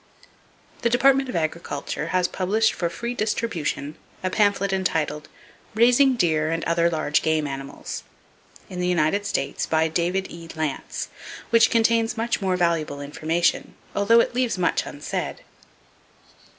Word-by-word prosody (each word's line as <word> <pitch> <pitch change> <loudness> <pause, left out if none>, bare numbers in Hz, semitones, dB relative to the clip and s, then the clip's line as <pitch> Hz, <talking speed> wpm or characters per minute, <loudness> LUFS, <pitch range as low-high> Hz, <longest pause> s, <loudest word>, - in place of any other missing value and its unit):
The 235 - +2
Department 270 +2 +4
of - - -4
Agriculture 155 -2 -3
has 180 +1 +1
published 210 +5 +1
for 170 - -2
free 235 +8 -4
distribution 200 -10 -2 0.3
a 185 - -1
pamphlet 200 -2 +2
entitled 155 -5 -1 0.5
"Raising 250 +4 +5
Deer 155 -7 +1
and 165 0 -1
Other 170 0 +2
Large 155 -2 +1
Game 160 -1 +1
Animals" 135 -1 -6 0.7
in 180 - -7
the 180 - 0
United 180 +4 +1
States, 135 - -2
by 160 0 +2
David 175 +4 0
E. 170 -1 -9
Lantz, 155 -3 -3 0.4
which 230 -1 +6
contains 230 0 +2
much 230 +1 0
valuable 170 -6 0
information, 155 +4 -1 0.2
although 230 +4 +5
it - - -2
leaves 245 -4 0
much 180 - 0
unsaid. - - -5
180 Hz, 135 wpm, -24 LUFS, 160-225 Hz, 0.7 s, which